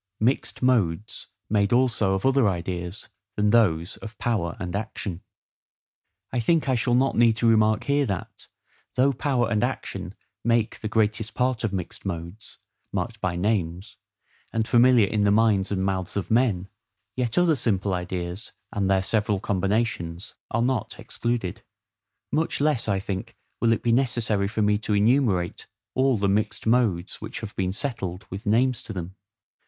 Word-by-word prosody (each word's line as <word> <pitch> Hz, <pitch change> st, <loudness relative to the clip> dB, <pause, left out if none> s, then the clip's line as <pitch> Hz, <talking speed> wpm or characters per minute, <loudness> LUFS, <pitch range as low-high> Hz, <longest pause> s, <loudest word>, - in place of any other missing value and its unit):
Mixed 125 Hz, +3 st, 0 dB
Modes 105 Hz, -6 st, +1 dB, 0.2 s
made 100 Hz, -1 st, +1 dB
also 115 Hz, -6 st, +3 dB
of 95 Hz, -, -3 dB
other 135 Hz, -5 st, +4 dB
Ideas 90 Hz, +1 st, -4 dB, 0.3 s
than 105 Hz, 0 st, +2 dB
those 90 Hz, -6 st, +2 dB
of 110 Hz, -2 st, -10 dB
Power 100 Hz, -8 st, -1 dB
and 90 Hz, 0 st, -4 dB
Action. 100 Hz, -4 st, -4 dB, 1.1 s
I 125 Hz, -, +1 dB
think 155 Hz, +6 st, +2 dB
I 130 Hz, -, +3 dB
shall 120 Hz, 0 st, +2 dB
not 135 Hz, +2 st, +2 dB
need 115 Hz, -1 st, +5 dB
to 115 Hz, +1 st, +1 dB
remark 110 Hz, 0 st, +4 dB
here 140 Hz, 0 st, +1 dB
that, 100 Hz, -4 st, -5 dB, 0.5 s
though 135 Hz, +2 st, +3 dB
power 125 Hz, -2 st, 0 dB
and 105 Hz, -2 st, +2 dB
action -, -, -3 dB, 0.3 s
make 115 Hz, -1 st, +1 dB
the 110 Hz, -, -4 dB
greatest 110 Hz, 0 st, 0 dB
part 125 Hz, -2 st, 0 dB
of 110 Hz, -, 0 dB
mixed 90 Hz, -3 st, -5 dB
modes, 85 Hz, +3 st, -6 dB, 0.3 s
marked 105 Hz, +3 st, -3 dB
by 90 Hz, -3 st, -1 dB
names, 90 Hz, -2 st, -1 dB, 0.5 s
and 110 Hz, -1 st, -1 dB
familiar 120 Hz, -2 st, +6 dB
in 105 Hz, +1 st, 0 dB
the 100 Hz, -, +4 dB
minds 105 Hz, -2 st, +3 dB
and 95 Hz, -1 st, 0 dB
mouths 95 Hz, -1 st, -2 dB
of 100 Hz, -, -3 dB
men, 110 Hz, -6 st, +2 dB, 0.5 s
yet 120 Hz, -3 st, -1 dB
other 175 Hz, -3 st, +4 dB
simple 100 Hz, -6 st, 0 dB
ideas, 90 Hz, +2 st, -4 dB, 0.2 s
and 100 Hz, -3 st, 0 dB
their 95 Hz, -1 st, +3 dB
several 105 Hz, 0 st, +1 dB
combinations, 100 Hz, -2 st, -1 dB, 0.2 s
are 115 Hz, +1 st, 0 dB
not 130 Hz, +1 st, -1 dB
excluded: 120 Hz, -6 st, -3 dB, 0.7 s
much 160 Hz, +2 st, 0 dB
less, 145 Hz, -6 st, +1 dB
I 100 Hz, -2 st, +2 dB
think, 95 Hz, -1 st, -5 dB, 0.2 s
will 115 Hz, -, +3 dB
it 115 Hz, -, 0 dB
be 120 Hz, -, +2 dB
necessary 115 Hz, -5 st, +1 dB
for 110 Hz, +1 st, -1 dB
me 105 Hz, 0 st, +3 dB
to 105 Hz, -1 st, -1 dB
enumerate 105 Hz, -5 st, +2 dB, 0.3 s
all 130 Hz, -2 st, +3 dB
the 100 Hz, 0 st, +1 dB
mixed 105 Hz, +2 st, 0 dB
modes 110 Hz, -7 st, +1 dB
which -, -, -6 dB
have 110 Hz, -2 st, -7 dB
been 95 Hz, -1 st, 0 dB
settled, 100 Hz, -5 st, -4 dB
with 95 Hz, +2 st, -6 dB
names 125 Hz, +3 st, +2 dB
to 110 Hz, -, -8 dB
them. 90 Hz, 0 st, -6 dB
110 Hz, 165 wpm, -25 LUFS, 95-120 Hz, 1.1 s, familiar